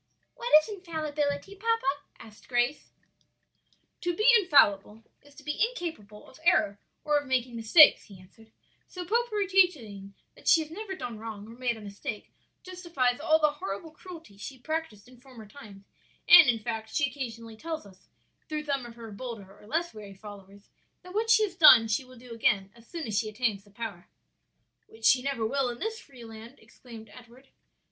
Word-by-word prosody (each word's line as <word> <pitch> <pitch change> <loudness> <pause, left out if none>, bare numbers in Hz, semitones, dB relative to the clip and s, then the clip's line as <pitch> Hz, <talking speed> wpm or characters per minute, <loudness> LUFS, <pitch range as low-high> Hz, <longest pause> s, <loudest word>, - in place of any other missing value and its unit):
"What 480 - -6
is - - -10
infallibility, 315 -3 -4
papa?" 455 +3 -1 0.3
asked 215 -2 -15
Grace. 245 +3 -1 1.1
"To 350 -1 -2
be 430 +6 +1
infallible 220 - +3 0.2
is 285 0 -21
to 290 - -14
be 300 +6 -1
incapable 320 - -5
of 260 - -17
error 205 -11 +2 0.2
or 300 -1 +2
of 290 - -11
making 255 -2 -1
mistakes," 230 +8 +6
he 195 -4 -14
answered. 220 +4 -20 0.4
"So 360 -1 -8
popery 435 0 0
teaching 245 - 0 0.2
that - - -16
she 330 - +6
has 310 0 -8
never 390 +2 -6
done 235 -11 -7
wrong 215 -2 -8
or 225 - -12
made 245 -2 -2
a - - -12
mistake 210 +3 -7 0.3
justifies 340 -9 -2
all 315 +1 +3
the 305 -1 +2
horrible 290 +1 -7
cruelties 320 - -13
she 265 +4 -8
practised 255 -7 -5
in 250 -1 -18
former 250 -5 -14
times; 210 -4 -14 0.4
and, 335 -5 +9
in 235 - +2
fact, 220 0 -5
she 285 +4 +1
occasionally 230 -4 -7
tells 320 +2 -6
us, 190 -2 -18 0.4
through 305 -1 -3
some 275 -4 -3
of 235 - -13
her 230 -2 -10
bolder 205 -3 -8
or 210 - -18
less 335 +6 -2
wary 205 -2 -11
followers, 200 0 -14 0.3
that 365 0 -12
what 445 +2 -1
she 450 -1 +5
has 385 -4 -3
done 255 -9 +8
she 220 +4 -1
will 255 0 -16
do 245 +1 -14
again 200 -4 0
as 235 0 -19
soon 335 -3 -6
as 215 - -4
she 215 - -3
attains 215 -3 -2
the - - -21
power." 205 -4 -8 0.8
"Which 225 0 -10
she 255 - +5
never 270 -4 -2
will 270 +2 0
in 240 - -6
this 445 - -4
free 255 - -14
land," 225 +3 -12
exclaimed 225 0 -14
Edward. 250 +2 -17
250 Hz, 185 wpm, -28 LUFS, 220-320 Hz, 1.1 s, and